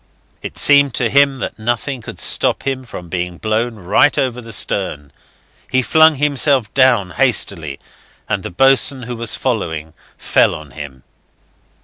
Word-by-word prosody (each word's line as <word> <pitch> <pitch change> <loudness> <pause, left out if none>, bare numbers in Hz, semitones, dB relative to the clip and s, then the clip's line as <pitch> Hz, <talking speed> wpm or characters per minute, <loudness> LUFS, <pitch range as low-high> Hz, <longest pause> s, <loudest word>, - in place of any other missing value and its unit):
It - - -8
seemed 140 -2 +4
to 120 -3 0
him 140 0 +3
that - - -5
nothing 120 +3 -3
could - - -10
stop - - +1
him 130 -1 -3
from 90 -7 -9
being 90 0 -4
blown 110 +3 -2
right 105 +9 +2
over 125 -2 -1
the 115 -1 -11
stern. 75 -10 -2 0.6
He 130 0 +2
flung 160 +3 +5
himself 140 -4 +1
down 120 -8 +3
hastily, 85 - 0 0.5
and - - -2
the - - -6
boatswain, 135 +5 +2
who 120 +1 -6
was 115 0 -1
following, 80 - -3 0.2
fell - - +2
on 75 -3 -11
him. 65 -3 -10
120 Hz, 150 wpm, -17 LUFS, 90-135 Hz, 0.6 s, flung